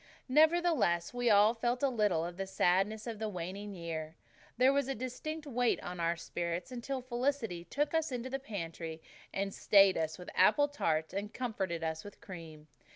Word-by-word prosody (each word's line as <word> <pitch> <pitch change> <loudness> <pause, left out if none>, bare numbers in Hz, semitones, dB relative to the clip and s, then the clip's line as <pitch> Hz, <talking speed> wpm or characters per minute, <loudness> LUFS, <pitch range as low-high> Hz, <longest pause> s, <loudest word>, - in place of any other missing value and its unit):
Nevertheless, 310 - +3
we 245 -1 +1
all 210 +1 +6
felt 240 +2 -1
a - - +5
little 210 -10 +1
of 175 0 -6
the 195 +1 -4
sadness 195 +3 +1
of 230 -3 -5
the 220 -1 -2
waning 195 +2 -5
year. 160 -2 -5 0.4
There 255 +3 +5
was 280 -1 +1
a 270 - -2
distinct 295 +6 -5
weight 245 -3 +1
on 180 0 -6
our 170 0 +1
spirits 170 +4 -4
until 255 +1 -4
Felicity 240 -8 -1
took 295 - -1
us 320 -3 +1
into 245 0 -3
the 270 - -2
pantry 165 -9 -6 0.3
and 195 0 -2
stayed 195 -3 +5
us 160 0 -2
with 180 - -9
apple 290 +6 +5
tarts 160 - -1
and 200 +2 -3
comforted 190 -9 -3
us 160 0 -2
with 205 - -11
cream. 160 -5 -10
205 Hz, 180 wpm, -33 LUFS, 170-255 Hz, 0.4 s, all